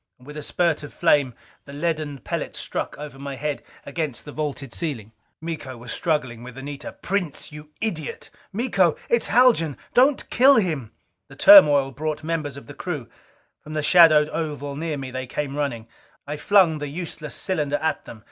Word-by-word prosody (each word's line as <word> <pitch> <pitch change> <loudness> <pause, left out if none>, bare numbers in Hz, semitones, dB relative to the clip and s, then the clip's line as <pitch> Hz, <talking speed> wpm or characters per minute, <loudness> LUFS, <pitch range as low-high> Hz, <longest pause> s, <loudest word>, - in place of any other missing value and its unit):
With 145 +4 -12
a 150 - -5
spurt 165 +1 0
of 145 - -10
flame 145 -7 +3 0.3
the 140 - -11
leaden 150 -3 -2
pellet - - -4
struck - - -4
over 145 -2 -9
my 140 0 -5
head 150 +1 -3 0.2
against 140 -4 -4
the 145 - -8
vaulted 145 -4 -4
ceiling. 130 - -4 0.3
Miko 160 -6 -6
was 120 0 -7
struggling 140 -8 -1
with 125 +1 -10
Anita. 140 +1 -7
"Prince, 185 -8 -3
you 150 0 -11
idiot!" 170 -9 -4 0.2
"Miko, 195 -6 +2
it's 235 - +2
Haljan! 225 - +4 0.2
Don't 265 +3 +4
kill 270 +3 +6
him 160 - 0 0.2
" 90 +3 -53
The 135 - -13
turmoil 145 - +8
brought 155 +2 -4
members 155 -4 -3
of 140 - -10
the 145 - -10
crew. 145 -10 -5 0.5
From 155 - -9
the 155 -1 -1
shadowed 155 -2 +7
oval 145 -4 -4
near 155 0 -3
me 135 -2 -6
they 130 0 -5
came 140 +1 -4
running. 130 -6 -3 0.4
I 145 - -4
flung 165 0 +4
the 145 - -4
useless 155 0 -6
cylinder 150 -7 -1
at 160 - -1
them. 110 - -10
150 Hz, 175 wpm, -23 LUFS, 140-165 Hz, 0.5 s, turmoil